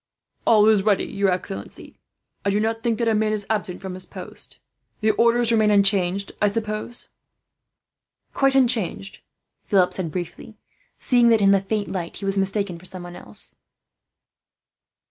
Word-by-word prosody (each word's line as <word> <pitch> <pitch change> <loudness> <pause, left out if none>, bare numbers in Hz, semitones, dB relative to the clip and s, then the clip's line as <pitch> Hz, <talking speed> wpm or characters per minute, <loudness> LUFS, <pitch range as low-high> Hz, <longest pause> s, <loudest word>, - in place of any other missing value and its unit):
"All 215 -2 +6
is 215 -2 +5
ready, 205 -1 +2
your 200 -1 0
excellency. 180 - -5 0.4
I 200 - +1
do 200 +1 +1
not 225 +1 -1
think 230 -1 0
that 235 - -1
a 225 - +3
man 215 0 +1
is 205 -2 -1
absent 195 -4 -3
from 190 -1 -5
his 185 0 -7
post. - - -9 0.4
The 215 0 +3
orders 235 +2 +2
remain 220 -2 +3
unchanged, 195 -1 +3
I 210 - +4
suppose?" 215 +2 -3 1.2
"Quite 270 0 +2
unchanged," 230 -7 +1 0.5
Philip 190 -4 +2
said 175 -4 -3
briefly, 180 +5 -7 0.4
seeing 245 -2 +3
that 225 -1 +4
in 195 -1 +4
the 195 -1 +4
faint 205 +1 -3
light 175 -3 -4
he 200 - -6
was 195 0 0
mistaken 195 -2 -1
for 180 - -16
someone 175 -2 -9
else. 105 -9 -4
205 Hz, 160 wpm, -23 LUFS, 190-220 Hz, 1.2 s, All